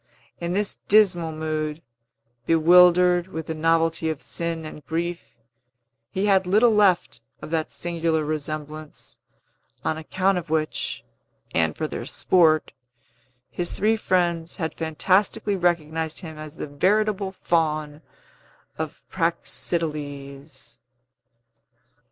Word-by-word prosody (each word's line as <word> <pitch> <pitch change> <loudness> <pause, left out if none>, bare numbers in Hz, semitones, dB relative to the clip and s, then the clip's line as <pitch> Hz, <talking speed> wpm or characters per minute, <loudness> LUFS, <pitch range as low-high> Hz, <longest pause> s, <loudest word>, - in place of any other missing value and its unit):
In 170 0 -3
this 205 +1 +1
dismal 180 -6 +3
mood, 155 0 -3 0.6
bewildered 175 +2 +5
with 160 -4 -6
the 160 - -3
novelty 165 0 +1
of 155 -3 -3
sin 165 -1 -4
and 150 -1 -9
grief, 170 +1 -2 0.9
he 190 +6 -1
had 190 -2 +3
little 220 +5 +4
left 190 - +2 0.2
of - - -9
that 160 -1 -1
singular 165 -2 -1
resemblance, 155 0 -5 0.7
on 160 - 0
account 185 +4 0
of 165 -2 -11
which, 155 -1 -2 0.5
and - - +1
for - - -2
their - - -5
sport, 160 -4 +3 0.8
his 175 -1 -2
three 215 +3 +2
friends 175 -5 0
had 160 -4 -3
fantastically 190 +6 +1
recognized 160 -3 -1
him 160 -3 -8
as 155 -1 -9
the - - -5
veritable 195 +6 +1
Faun 155 -4 -1 0.8
of - - -5
Praxiteles. 140 -5 -2
165 Hz, 110 wpm, -24 LUFS, 155-180 Hz, 0.9 s, bewildered